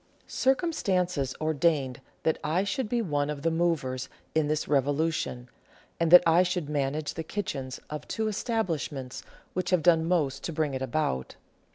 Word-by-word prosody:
Circumstances 185 Hz, -, 0 dB
ordained 155 Hz, -4 st, +1 dB, 0.2 s
that 160 Hz, -, +1 dB
I 165 Hz, +5 st, +1 dB
should 210 Hz, +3 st, -2 dB
be 235 Hz, 0 st, +1 dB
one 145 Hz, -5 st, 0 dB
of 145 Hz, -2 st, -4 dB
the 165 Hz, -, +2 dB
movers 160 Hz, -7 st, 0 dB, 0.2 s
in 155 Hz, -2 st, +2 dB
this 155 Hz, 0 st, -1 dB
revolution, 145 Hz, -2 st, 0 dB, 0.5 s
and 165 Hz, -1 st, +2 dB
that 180 Hz, +1 st, +10 dB
I 165 Hz, +1 st, +5 dB
should 180 Hz, -4 st, -1 dB
manage 145 Hz, +1 st, -1 dB
the 165 Hz, -, -4 dB
kitchens 140 Hz, -8 st, -4 dB
of 150 Hz, -1 st, -6 dB
two 220 Hz, -1 st, -1 dB
establishments 170 Hz, -, -2 dB, 0.3 s
which 180 Hz, -1 st, -2 dB
have 180 Hz, -3 st, +2 dB
done 165 Hz, -1 st, +5 dB
most 150 Hz, -6 st, 0 dB
to -, -, -2 dB
bring 155 Hz, -2 st, 0 dB
it 130 Hz, -, -3 dB
about. 130 Hz, -, -1 dB
160 Hz, 160 wpm, -28 LUFS, 140-180 Hz, 0.5 s, that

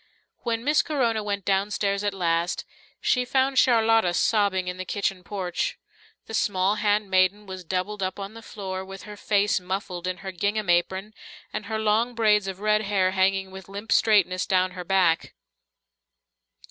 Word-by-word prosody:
When 230 Hz, -1 st, -2 dB
Miss 295 Hz, +3 st, +3 dB
Corona 235 Hz, -8 st, 0 dB
went 200 Hz, -2 st, -3 dB
downstairs 200 Hz, 0 st, 0 dB
at 205 Hz, -, +1 dB
last, 170 Hz, -1 st, 0 dB, 0.3 s
she 250 Hz, -, +2 dB
found 265 Hz, +1 st, +2 dB
Charlotta 225 Hz, -6 st, +4 dB
sobbing 200 Hz, -4 st, +2 dB
in 180 Hz, 0 st, -4 dB
the 185 Hz, -, -4 dB
kitchen 195 Hz, -1 st, -2 dB
porch. 195 Hz, -, -3 dB, 0.5 s
The -, -, -10 dB
small 200 Hz, -1 st, +1 dB
handmaiden 205 Hz, -1 st, +2 dB
was 185 Hz, -1 st, -8 dB
doubled 190 Hz, +4 st, -3 dB
up 185 Hz, +1 st, -2 dB
on 200 Hz, +1 st, -6 dB
the 225 Hz, -, -10 dB
floor, 190 Hz, -4 st, -6 dB
with 195 Hz, 0 st, -10 dB
her 210 Hz, -1 st, -9 dB
face 205 Hz, -1 st, +1 dB
muffled 180 Hz, -1 st, -4 dB
in 185 Hz, 0 st, -2 dB
her 190 Hz, -, -3 dB
gingham 205 Hz, +1 st, 0 dB
apron 190 Hz, +4 st, 0 dB, 0.4 s
and 205 Hz, -, -4 dB
her 220 Hz, -, -2 dB
long 220 Hz, +3 st, +1 dB
braids 210 Hz, -3 st, +3 dB
of 190 Hz, 0 st, -6 dB
red 215 Hz, 0 st, +3 dB
hair 195 Hz, -3 st, +1 dB
hanging 190 Hz, 0 st, +1 dB
with 190 Hz, 0 st, -11 dB
limp 205 Hz, +3 st, -7 dB
straightness 185 Hz, -6 st, +3 dB
down 185 Hz, -1 st, +2 dB
her 180 Hz, -1 st, -7 dB
back. 175 Hz, -3 st, +1 dB
200 Hz, 165 wpm, -25 LUFS, 185-215 Hz, 0.5 s, Charlotta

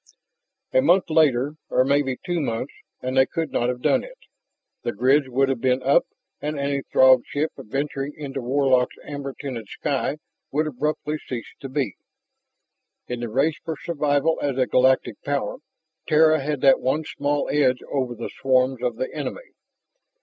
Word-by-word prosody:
A 130 Hz, -, +5 dB
month 170 Hz, +4 st, +3 dB
later, 145 Hz, -2 st, +3 dB
or 130 Hz, -, +3 dB
maybe 140 Hz, -2 st, +1 dB
two 175 Hz, -2 st, 0 dB
months, 130 Hz, -2 st, -3 dB, 0.3 s
and 130 Hz, +1 st, -2 dB
they 130 Hz, 0 st, +5 dB
could 165 Hz, -3 st, -3 dB
not 120 Hz, -, +1 dB
have 125 Hz, 0 st, -4 dB
done -, -, +3 dB
it. -, -, -12 dB, 0.6 s
The 120 Hz, -, -3 dB
grids 130 Hz, +5 st, +3 dB
would 135 Hz, +2 st, +2 dB
have 135 Hz, -3 st, -1 dB
been 130 Hz, 0 st, +1 dB
up, 140 Hz, -, +4 dB, 0.3 s
and 150 Hz, 0 st, -3 dB
any 140 Hz, 0 st, -1 dB
Throg 130 Hz, -1 st, +7 dB
ship 150 Hz, +2 st, -1 dB
venturing 140 Hz, +4 st, -3 dB
into 140 Hz, -2 st, -5 dB
Warlock's 130 Hz, 0 st, +2 dB
amber 140 Hz, -2 st, -6 dB
tinted 125 Hz, -7 st, -5 dB
sky 140 Hz, 0 st, -2 dB, 0.3 s
would 155 Hz, +3 st, +1 dB
abruptly 150 Hz, +1 st, -2 dB
cease 120 Hz, -3 st, -7 dB
to 135 Hz, -, -7 dB
be. 130 Hz, -6 st, -2 dB, 1.1 s
In 125 Hz, -1 st, -4 dB
the 120 Hz, -1 st, -4 dB
race 140 Hz, +7 st, +1 dB
for 160 Hz, -2 st, -4 dB
survival 150 Hz, 0 st, 0 dB
as 140 Hz, -3 st, -1 dB
a 130 Hz, -, +3 dB
galactic 130 Hz, +3 st, +2 dB
power, 145 Hz, -, -2 dB, 0.5 s
Terra 155 Hz, 0 st, +5 dB
had 145 Hz, -1 st, -2 dB
that 135 Hz, -, +6 dB
one 140 Hz, +5 st, 0 dB
small 145 Hz, 0 st, -1 dB
edge 130 Hz, -4 st, +2 dB
over 130 Hz, -3 st, -1 dB
the 115 Hz, -, -6 dB
swarms 130 Hz, -1 st, +2 dB
of 125 Hz, -2 st, -1 dB
the 130 Hz, -, -4 dB
enemy. -, -, -5 dB
135 Hz, 165 wpm, -23 LUFS, 130-150 Hz, 1.1 s, Throg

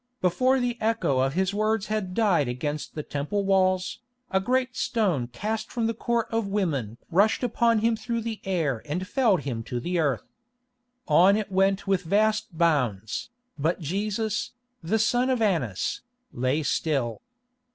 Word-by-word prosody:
Before 255 Hz, +9 st, +2 dB
the 245 Hz, -1 st, -1 dB
echo 220 Hz, -12 st, +1 dB
of 135 Hz, +1 st, +1 dB
his 190 Hz, +1 st, +1 dB
words 215 Hz, 0 st, +1 dB
had 210 Hz, -4 st, -3 dB
died 190 Hz, -, +3 dB
against 145 Hz, +5 st, -4 dB
the 150 Hz, -, -3 dB
Temple 150 Hz, +10 st, -2 dB
walls, 185 Hz, -1 st, +2 dB, 0.3 s
a 190 Hz, -, +3 dB
great 255 Hz, +4 st, 0 dB
stone 185 Hz, -, 0 dB
cast 210 Hz, -, -4 dB
from 235 Hz, -3 st, -1 dB
the 230 Hz, -, +1 dB
Court 235 Hz, 0 st, -1 dB
of 225 Hz, -2 st, 0 dB
Women 150 Hz, -, -1 dB
rushed 205 Hz, +8 st, +3 dB
upon 230 Hz, -2 st, +2 dB
him 230 Hz, +1 st, +2 dB
through 235 Hz, +1 st, -3 dB
the 225 Hz, -1 st, -5 dB
air 160 Hz, -, -1 dB
and 180 Hz, +5 st, -3 dB
felled 220 Hz, -, +2 dB
him 125 Hz, -5 st, -3 dB
to 120 Hz, -, -3 dB
the 175 Hz, +7 st, -1 dB
earth. 140 Hz, -7 st, +1 dB, 0.8 s
On 180 Hz, +6 st, +6 dB
it 210 Hz, -2 st, -3 dB
went 195 Hz, +1 st, +2 dB
with 195 Hz, -2 st, +1 dB
vast 210 Hz, 0 st, +1 dB
bounds, 125 Hz, -, 0 dB, 0.3 s
but 160 Hz, +6 st, 0 dB
Jesus, 205 Hz, +6 st, -2 dB, 0.3 s
the 180 Hz, +7 st, 0 dB
son 245 Hz, +4 st, +2 dB
of 255 Hz, -2 st, +1 dB
Annas, 165 Hz, -, 0 dB, 0.3 s
lay 130 Hz, +5 st, 0 dB
still. 135 Hz, -7 st, -1 dB
190 Hz, 160 wpm, -26 LUFS, 150-220 Hz, 0.8 s, On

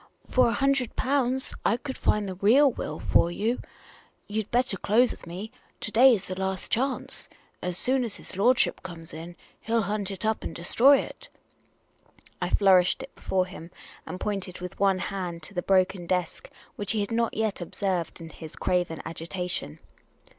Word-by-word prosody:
" -, -, -36 dB
For 255 Hz, -1 st, +6 dB
a 230 Hz, -, +1 dB
hundred 270 Hz, -3 st, +1 dB
pounds 260 Hz, -1 st, +1 dB
I 230 Hz, -, +2 dB
could 265 Hz, +1 st, -6 dB
find 210 Hz, -1 st, +1 dB
the 190 Hz, -, -3 dB
real 240 Hz, +10 st, +5 dB
will -, -, -5 dB
for 170 Hz, -, +3 dB
you. 220 Hz, +8 st, -1 dB, 0.6 s
You 215 Hz, +1 st, -1 dB
'd 210 Hz, -, -11 dB
better 245 Hz, -3 st, +2 dB
close 230 Hz, +7 st, +3 dB
with -, -, -9 dB
me. 190 Hz, +6 st, -6 dB, 0.3 s
To 210 Hz, -, -3 dB
day 250 Hz, +3 st, +7 dB
is 195 Hz, -2 st, -5 dB
the 185 Hz, -, -4 dB
last 190 Hz, 0 st, -2 dB
chance. 265 Hz, +3 st, -1 dB, 0.3 s
As 180 Hz, -1 st, -2 dB
soon 260 Hz, +3 st, +1 dB
as 230 Hz, -5 st, -3 dB
his -, -, -8 dB
lordship 235 Hz, +6 st, +3 dB
comes 165 Hz, -3 st, -9 dB
in, 170 Hz, +2 st, -8 dB, 0.2 s
he 225 Hz, -, -9 dB
'11 230 Hz, -3 st, +2 dB
hunt 205 Hz, -2 st, -2 dB
it 195 Hz, 0 st, -4 dB
up 220 Hz, 0 st, 0 dB
and -, -, -5 dB
destroy 250 Hz, +11 st, +5 dB
it." -, -, -10 dB, 1.1 s
I 180 Hz, -, 0 dB
flourished 185 Hz, -2 st, +4 dB
it -, -, -11 dB
before 185 Hz, -1 st, 0 dB
him, 180 Hz, -3 st, -10 dB, 0.4 s
and 185 Hz, -, -6 dB
pointed 195 Hz, -3 st, -3 dB
with 180 Hz, 0 st, -7 dB
one 195 Hz, -1 st, +3 dB
hand 180 Hz, -4 st, -4 dB
to 200 Hz, -, -7 dB
the 180 Hz, -, -1 dB
broken 185 Hz, -2 st, +2 dB
desk, 185 Hz, -, -2 dB, 0.3 s
which 205 Hz, -2 st, 0 dB
he 215 Hz, -, +1 dB
had 200 Hz, -, -3 dB
not 230 Hz, 0 st, 0 dB
yet 220 Hz, -4 st, -1 dB
observed 180 Hz, -1 st, -2 dB
in 165 Hz, -1 st, -8 dB
his 160 Hz, -1 st, -10 dB
craven 175 Hz, -3 st, -1 dB
agitation. 170 Hz, -, -4 dB
195 Hz, 190 wpm, -27 LUFS, 180-235 Hz, 1.1 s, day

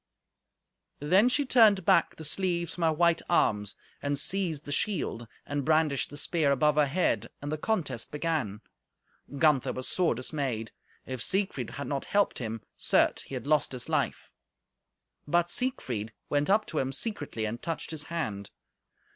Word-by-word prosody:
Then 190 Hz, -, +4 dB
she 285 Hz, +3 st, +1 dB
turned 215 Hz, -8 st, +5 dB
back -, -, +4 dB
the 160 Hz, -, -7 dB
sleeves 170 Hz, 0 st, 0 dB
from 175 Hz, -, -4 dB
her 160 Hz, -, +4 dB
white 170 Hz, +1 st, +3 dB
arms, 105 Hz, -, +2 dB, 0.3 s
and 145 Hz, 0 st, -1 dB
seized 165 Hz, -1 st, 0 dB
the 145 Hz, -, -6 dB
shield, 145 Hz, -, -1 dB, 0.2 s
and 145 Hz, -1 st, -2 dB
brandished 155 Hz, -2 st, +2 dB
the 145 Hz, -, -9 dB
spear 155 Hz, -1 st, +1 dB
above 150 Hz, +2 st, +3 dB
her 150 Hz, -1 st, +4 dB
head, 175 Hz, +7 st, 0 dB
and 145 Hz, +1 st, -5 dB
the 155 Hz, -, -1 dB
contest 150 Hz, -, -1 dB
began. 150 Hz, -10 st, -2 dB, 0.8 s
Gunther 135 Hz, -4 st, +3 dB
was 130 Hz, -, -3 dB
sore 175 Hz, -8 st, +1 dB
dismayed. 130 Hz, -4 st, -3 dB, 0.3 s
If 130 Hz, -2 st, -5 dB
Siegfried 190 Hz, -, 0 dB
had 140 Hz, -, -4 dB
not 140 Hz, -1 st, -3 dB
helped 205 Hz, 0 st, +1 dB
him, 115 Hz, -2 st, -5 dB
certes -, -, +3 dB
he 135 Hz, -, -7 dB
had 125 Hz, -, -5 dB
lost 150 Hz, -2 st, +2 dB
his 125 Hz, -, -5 dB
life; -, -, -1 dB, 1.0 s
but 175 Hz, +3 st, +2 dB
Siegfried 125 Hz, -, -1 dB, 0.2 s
went 145 Hz, +2 st, +1 dB
up 210 Hz, +2 st, +4 dB
to 155 Hz, -, -2 dB
him 135 Hz, 0 st, -1 dB
secretly, 145 Hz, -, -3 dB
and 115 Hz, +2 st, -4 dB
touched 165 Hz, -1 st, -4 dB
his 150 Hz, -2 st, -5 dB
hand. 105 Hz, -13 st, -4 dB
150 Hz, 165 wpm, -29 LUFS, 130-175 Hz, 1.0 s, turned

